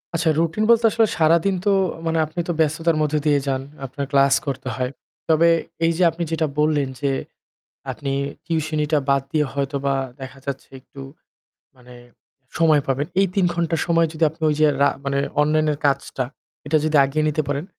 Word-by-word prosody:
আচ্ছা 165 Hz, 0 st, +1 dB
routine 170 Hz, +6 st, 0 dB
বলতে 235 Hz, 0 st, +5 dB
আসলে 225 Hz, +1 st, +3 dB
সারাদিন 170 Hz, +4 st, +3 dB
তো 205 Hz, -, +4 dB, 0.3 s
মানে 165 Hz, 0 st, 0 dB
আপনি 155 Hz, +3 st, -8 dB
তো 175 Hz, -, 0 dB
ব্যস্ততার 160 Hz, +1 st, +1 dB
মধ্য 150 Hz, 0 st, 0 dB
দিয়ে 145 Hz, -2 st, +3 dB
যান, 135 Hz, -1 st, 0 dB, 0.2 s
আপনার 140 Hz, +2 st, -5 dB
class 140 Hz, 0 st, +4 dB
করতে 135 Hz, -2 st, -4 dB
হয়। 125 Hz, -1 st, -2 dB, 0.4 s
তবে 165 Hz, +1 st, +5 dB, 0.4 s
এই 165 Hz, -, +3 dB
যে 185 Hz, -, +2 dB
আপনি 170 Hz, +2 st, -4 dB
যেটা 160 Hz, -1 st, 0 dB
বললেন, 150 Hz, -2 st, +2 dB
যে 140 Hz, -, +1 dB, 0.8 s
আপনি 140 Hz, -1 st, -5 dB, 0.3 s
tuition 160 Hz, -2 st, -1 dB
টা 150 Hz, -, +4 dB
বাদ 140 Hz, 0 st, +3 dB
দিয়ে 150 Hz, -1 st, +1 dB
হয়তোবা 140 Hz, 0 st, -1 dB, 0.3 s
দেখা 130 Hz, +1 st, -9 dB
যাচ্ছে 140 Hz, -1 st, -5 dB
একটু 135 Hz, +1 st, -13 dB, 0.7 s
মানে 125 Hz, -1 st, -16 dB, 0.6 s
সময় 155 Hz, -3 st, +4 dB
পাবেন। 135 Hz, +2 st, 0 dB, 0.2 s
এই 195 Hz, -, +3 dB
৩ 195 Hz, -3 st, +3 dB
ঘন্টা 170 Hz, -1 st, -1 dB
সময় 165 Hz, -1 st, +2 dB
যদি 160 Hz, +1 st, -2 dB
আপনি 160 Hz, +2 st, -19 dB
ঐ -, -, +4 dB
যে 155 Hz, -, +5 dB
রা 140 Hz, -, +6 dB, 0.2 s
মানে 140 Hz, 0 st, -1 dB, 0.2 s
অনলাইনের 150 Hz, 0 st, +1 dB
কাজটা 135 Hz, -2 st, 0 dB, 0.4 s
এটা 155 Hz, +2 st, +2 dB
যদি 155 Hz, 0 st, 0 dB
আগিয়ে 145 Hz, +3 st, 0 dB
নিতে 150 Hz, +1 st, 0 dB
পারেন, 145 Hz, +3 st, -2 dB
155 Hz, 180 wpm, -21 LUFS, 140-165 Hz, 0.8 s, রা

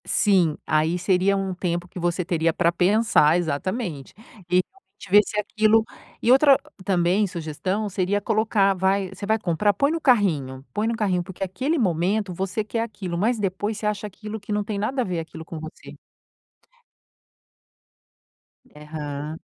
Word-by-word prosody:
Sim, 180 Hz, -7 st, +2 dB
aí 155 Hz, +3 st, +1 dB
seria 190 Hz, +2 st, +2 dB
um 195 Hz, -1 st, -2 dB
tempo 175 Hz, -1 st, -3 dB
que 180 Hz, -, -9 dB
você 175 Hz, +1 st, -1 dB
teria 165 Hz, -1 st, +1 dB
pra 165 Hz, +1 st, +2 dB
pensar 180 Hz, -3 st, +3 dB
Exatamente. 175 Hz, -, -3 dB, 0.4 s
E 180 Hz, +1 st, +4 dB
realmente 385 Hz, -, -17 dB
ver 205 Hz, +1 st, +8 dB
se 210 Hz, -, -3 dB
aquilo 215 Hz, +1 st, +3 dB, 0.4 s
e 240 Hz, -, +3 dB
outra 275 Hz, +1 st, +6 dB, 0.2 s
também 185 Hz, +2 st, +2 dB
sugestão 180 Hz, +5 st, -3 dB
seria 195 Hz, +2 st, 0 dB
colocar 215 Hz, -2 st, +2 dB
vai 190 Hz, +1 st, +1 dB
você 200 Hz, -, -7 dB
vai 220 Hz, +2 st, +2 dB
comprar? 205 Hz, +1 st, +1 dB
Põe 280 Hz, +9 st, +1 dB
no 330 Hz, 0 st, -2 dB
carrinho. 155 Hz, -, +1 dB
Põe 210 Hz, +2 st, 0 dB
no 230 Hz, -, 0 dB
carrinho, 190 Hz, -5 st, 0 dB
porque 190 Hz, +1 st, -7 dB
aquele 255 Hz, -, -1 dB
momento 190 Hz, -, 0 dB
você 190 Hz, +4 st, -2 dB
quer 225 Hz, +2 st, -3 dB
aquilo, 200 Hz, -6 st, -4 dB
mas 225 Hz, +6 st, +1 dB
depois 205 Hz, +2 st, -2 dB
você 215 Hz, -, -6 dB
acha 210 Hz, 0 st, -1 dB
aquilo 210 Hz, +2 st, -8 dB
que 205 Hz, -, -9 dB
não 210 Hz, 0 st, 0 dB
tem 205 Hz, 0 st, -4 dB
nada 255 Hz, +6 st, -1 dB
a -, -, -1 dB
ver 180 Hz, -3 st, -2 dB
aquilo 160 Hz, 0 st, -8 dB
com 165 Hz, -1 st, -7 dB
você. 160 Hz, 0 st, -10 dB, 2.7 s
Eham. 150 Hz, -2 st, -6 dB
195 Hz, 165 wpm, -24 LUFS, 170-215 Hz, 2.7 s, ver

